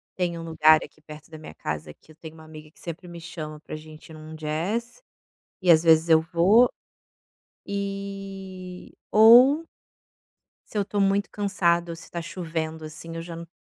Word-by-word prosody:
Tem 175 -2 -1
um - - -7
lugar 155 -1 +5
aqui - - -14
perto 150 0 -13
da 160 - -10
minha 155 - -11
casa 75 0 -5
que 155 - -22
eu - - -18
tenho 160 0 -11
uma 160 - -14
amiga 155 -1 -12
que - - -23
sempre 170 +1 -8
me 170 -1 -9
chama 155 -3 -7
para 155 - -8
gente 155 +1 -12
ir 160 - -11
num 155 0 -11
jazz, 175 - -3 0.6
e 180 -1 +5
às 160 -1 +6
vezes, 160 0 +5
eu 160 -1 +6
vou. 185 +9 +4 1.0
Eh, 195 -2 -6 0.2
ou 245 +8 +7 1.1
se - - -4
eu - - +2
tô 200 +1 -3
muito 195 +1 +2
cansada, 175 -4 0
ou - - -6
se 165 - -14
tá 170 - -5
chovendo 160 -2 -5
assim, 155 +2 -9
eu 165 - -4
já 165 0 -8
não 170 0 -9
170 Hz, 185 wpm, -25 LUFS, 155-195 Hz, 1.1 s, ou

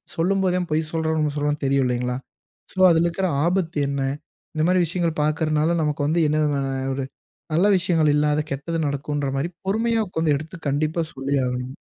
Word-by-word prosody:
சொல்லும்போதே 185 +1 +1
அவன் 175 - -4
பொய் 155 0 0
சொல்றானா, 160 -1 0
உண்ம 150 -1 0
சொல்றானான்னு 145 0 -1
தெரியும் 135 -1 +2
இல்லைங்களா? 125 0 -1 0.6
சோ - - -19
அதில 165 +1 +3
இருக்கிற 185 +2 -1 0.2
ஆபத்து 175 -3 0
என்ன? 140 -1 -2 0.5
இந்த 155 - +1
மாரி 180 0 +3
விஷயங்கள் 170 -2 -1
பாக்கிறனால, 155 +1 +1
நமக்கு 150 -1 -1
வந்து 165 +3 +1
என்ன 155 - +1
விதமான 140 -2 0 0.3
ஒரு 135 -1 -2 0.5
நல்ல 180 +6 +4
விஷயங்கள், 165 -4 +2
இல்லாத 150 0 +2
கெட்டது 160 +5 -3
நடக்குன்ற 145 0 -2
மாரி, 160 +6 -1 0.2
பொறுமையா 225 +3 +1
உக்காந்து, 160 -4 +1
எடுத்து 160 +5 -9
கண்டிப்பா 155 +4 0
சொல்லியே 135 0 -1
ஆகணும். 125 +2 -4
155 Hz, 170 wpm, -23 LUFS, 145-170 Hz, 0.6 s, நல்ல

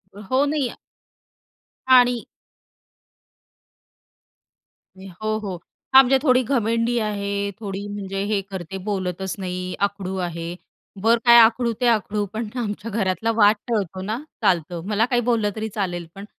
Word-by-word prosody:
हो, 255 +8 0
नाही 285 -3 0 1.2
आणि 245 -2 +5 2.7
हो, 195 +3 -4
हो, 200 -4 -5 0.4
हां, 265 0 +10
म्हणजे 265 +1 +3
थोडी 255 -3 +4
घमेंडी 230 -1 0
आहे, 200 -2 -2
थोडी 200 -1 -5
म्हणजे 195 -1 -4
हे 205 -1 0
करते, 190 0 -6
बोलतच 190 -1 -2
नाही, 180 -1 -4
आकडू 195 -2 -6
आहे, 170 0 -6 0.5
बर 230 +2 +4
काय 235 0 +8
आकडू 230 +1 +4
ते 245 - +3
आकडू, 210 -2 +1
पण 220 +1 -3
आमच्या 210 0 -4
घरातला 210 +2 0
वाद 210 -1 +5
टळतो 195 -5 -2
ना, 215 +4 -3 0.3
चालतं. 175 -3 +1
मला 215 +1 +2
काही 245 -1 +1
बोललं 230 -3 +1
तरी 220 0 -3
चालेल, 175 -4 -2
पण 195 - -8
210 Hz, 130 wpm, -22 LUFS, 190-230 Hz, 2.7 s, हां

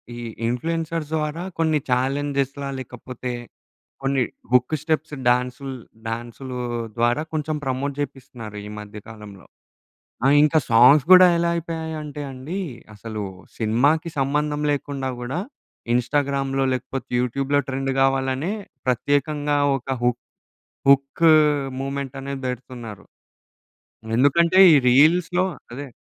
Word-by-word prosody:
ఈ - - -8 0.3
ఇన్‌ఫ్లూ‌ఎన్‌సర్స్ 160 +5 -2
ద్వారా 155 +2 -2 0.2
కొన్ని 160 -1 +2
చాలెంజేస్ 135 +2 0 0.3
లేకపోతే, 125 0 -7 0.7
కొన్ని 135 -1 +1 0.3
హుక్ 125 +4 +3
స్టెప్స్ 155 -1 -1
డాన్సు‌ల్ 125 +2 0 0.3
డాన్స్‌లు 120 +3 -5 0.4
ద్వారా 120 +5 +2
కొంచెం 155 0 -2
ప్రమోట్ 135 +2 -2
చేపిస్తున్నారు 125 -6 -7
ఈ - - -7
మధ్య 105 0 -9
కాలంలో. 105 -3 -11 0.8
ఆ! - - +6 0.2
ఇంకా 155 +1 +4
సాంగ్స్ 125 +5 +7
గూడా 185 0 +10
ఎలా 170 0 +1
అయిపోయాయి 160 -1 -4
అంటే 150 -1 -6
అండి, 135 +8 -6 0.4
అసలు 110 0 -6 0.3
సినిమాకి 140 +9 +2
సంబంధం 150 +2 0
లేకుండా 140 -2 -3
గూడా 130 +7 -3 0.6
ఇన్‌స్టా‌గ్రామ్‌లో 135 +1 0
లేకపోతే, 130 +1 -5
యూట్యూ‌బ్‌లో 140 +3 0
ట్రెండ్ 135 0 -2
కావాలనే 135 +5 +1 0.3
ప్రత్యేకంగా 145 +3 +1 0.2
ఒక 130 0 -4
హు 125 - +4 0.8
హుక్ 140 +4 +3 0.6
మూవ్‌మెంట్ 135 -1 -4
అనేది 135 0 -6
పెడుతున్నారు. 120 -4 -8 1.1
ఎందుకంటే, 170 +7 +4 0.2
ఈ - - +7
రీల్స్‌లో 170 +7 +4 0.3
అదే. 140 +2 -6
135 Hz, 110 wpm, -23 LUFS, 125-150 Hz, 1.1 s, గూడా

